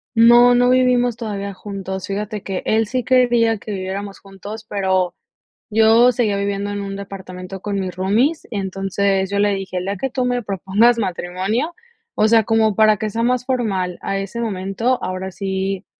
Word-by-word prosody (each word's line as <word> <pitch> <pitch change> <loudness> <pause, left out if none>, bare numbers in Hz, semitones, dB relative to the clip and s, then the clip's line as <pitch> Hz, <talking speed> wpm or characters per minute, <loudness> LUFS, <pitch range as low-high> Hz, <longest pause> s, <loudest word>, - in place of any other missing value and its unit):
No, 240 +2 +7
no 245 0 +4
vivimos 250 -2 +3
todavía 200 -4 -5
juntos. 190 -1 -6
Fíjate 210 +1 -4
que 190 -2 -4
él 220 0 +2
sí 255 0 -2
quería 240 -3 +3
que 210 - -8
viviéramos 195 +1 -5
juntos, 205 +3 -10
pero 190 -3 0 0.6
yo 225 +3 +5
seguía 220 -4 0
viviendo 200 0 -2
en 205 0 -3
un 195 0 -5
departamento 190 -1 -8
con 200 -1 -2
mis 185 -2 -4
roomies, 225 - +1
entonces 195 -1 -1
yo 200 0 -1
le 205 0 +3
dije: 190 -1 -4
"El 180 - -3
día 200 0 -2
que 270 - -2
tú 255 0 -1
me 245 0 0
propongas 200 +5 +2
matrimonio, 195 - -2 0.4
o 215 - +3
sea, 225 -1 +5
como 220 -2 +2
para 215 -1 +4
que 215 0 -3
sea 230 +3 -2
más 250 0 +1
formal 200 -9 -1
a 195 - -2
ese 195 +4 -5
momento, 220 +3 -1
ahora 185 +1 -4
sí, 190 0 -3
205 Hz, 175 wpm, -20 LUFS, 195-230 Hz, 0.6 s, No